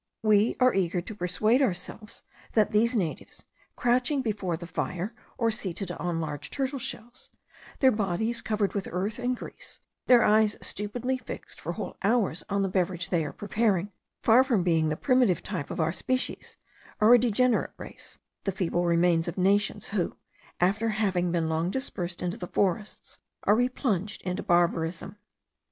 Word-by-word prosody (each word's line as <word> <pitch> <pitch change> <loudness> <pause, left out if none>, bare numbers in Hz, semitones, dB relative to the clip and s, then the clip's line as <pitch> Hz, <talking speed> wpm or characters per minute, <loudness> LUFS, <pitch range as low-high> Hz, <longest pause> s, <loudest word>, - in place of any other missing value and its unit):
We 215 0 +4
are 255 0 +5
eager 180 -2 +1
to 180 +5 -6
persuade 215 +7 +1
ourselves 210 -1 -3 0.3
that 215 -1 +3
these 230 +3 +2
natives, 180 -8 -3 0.3
crouching 250 +3 +1
before 200 -7 -2
the 170 - -8
fire, 180 +4 -3 0.2
or 230 -2 +2
seated 195 -2 -3
on 175 -1 -2
large 150 -2 -4
turtle 270 0 -2
shells, 240 0 -6 0.5
their 265 -1 +6
bodies 215 +2 -1
covered 210 -2 0
with 200 -2 -3
earth 200 +6 -2
and 250 0 -1
grease, - - -10 0.3
their 245 -3 +7
eyes 215 0 +4
stupidly 245 +5 -3
fixed - - -9
for - - -3
whole - - -6
hours 200 -5 +1
on 200 -1 +1
the - - +1
beverage 180 -2 -1
they 170 -3 +1
are 145 - -4
preparing, 205 -2 0 0.3
far 240 +3 +6
from 235 -9 +1
being 165 -3 +2
the 155 - -2
primitive 250 - +2
type 185 -8 -4
of - - -5
our 160 0 +1
species, 255 +6 -3 0.4
are 215 +3 +7
a 245 - +8
degenerate 245 +1 +2
race, - - -10 0.3
the 195 - +1
feeble 175 -2 -1
remains 170 0 +3
of 170 - -4
nations 200 +2 +1
who, 195 -4 -1 0.4
after 200 +6 +2
having 190 -5 0
been 165 -2 0
long 160 +2 0
dispersed 185 -8 -4
in 175 - 0
the 185 -2 -6
forests, 200 +3 -2 0.2
are - - +4
replunged 220 -5 -1
into 180 -1 -2
barbarism. 175 +2 0
200 Hz, 165 wpm, -27 LUFS, 175-230 Hz, 0.5 s, a